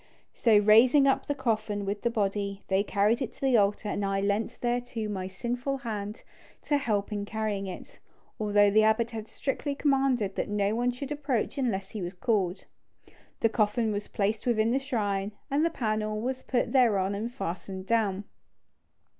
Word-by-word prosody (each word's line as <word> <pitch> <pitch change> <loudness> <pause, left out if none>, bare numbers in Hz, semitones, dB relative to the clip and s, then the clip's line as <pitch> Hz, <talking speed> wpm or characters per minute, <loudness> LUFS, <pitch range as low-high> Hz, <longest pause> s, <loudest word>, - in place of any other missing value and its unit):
So, 225 -3 +4
raising 230 +7 +6
up 270 - +2
the 290 - 0
coffin 215 -6 -1
with 205 +1 -3
the 235 - +1
body, 200 -3 -2
they 190 0 +3
carried 210 +4 +1
it 260 - -2
to - - -22
the 265 -2 +3
altar, 205 0 +1
and 205 0 -2
I 195 0 0
lent 205 +4 -1
thereto 240 -2 -2
my 190 -3 -3
sinful 245 +8 -3
hand 215 -4 -5 0.4
to 290 - +2
help 210 -7 -1
in 205 -1 -2
carrying 210 -2 -3
it, 185 - -9 0.4
although 205 -1 +4
the 215 +2 +5
abbot 220 +2 +2
had 220 -1 -6
strictly 280 +3 -3
commanded 270 -8 +1
that - - -1
no 205 0 +1
one 240 +2 +1
should 260 +3 -5
approach 280 -3 -1
unless 195 -7 -1
he 215 - -5
was 175 +1 -5
called. 195 -3 0 0.8
The 225 - +4
coffin 220 0 +1
was 205 0 -3
placed 210 +3 -1
within 225 -1 +2
the 265 - +2
shrine, 205 -6 -2 0.2
and 290 +3 +2
the 335 - +3
panel 215 -6 -2
was 255 +3 -3
put 245 - -1
thereon 205 -7 +3
and 220 +4 -3
fastened 190 -4 -5
down. 205 -3 +1
215 Hz, 180 wpm, -28 LUFS, 200-245 Hz, 0.8 s, raising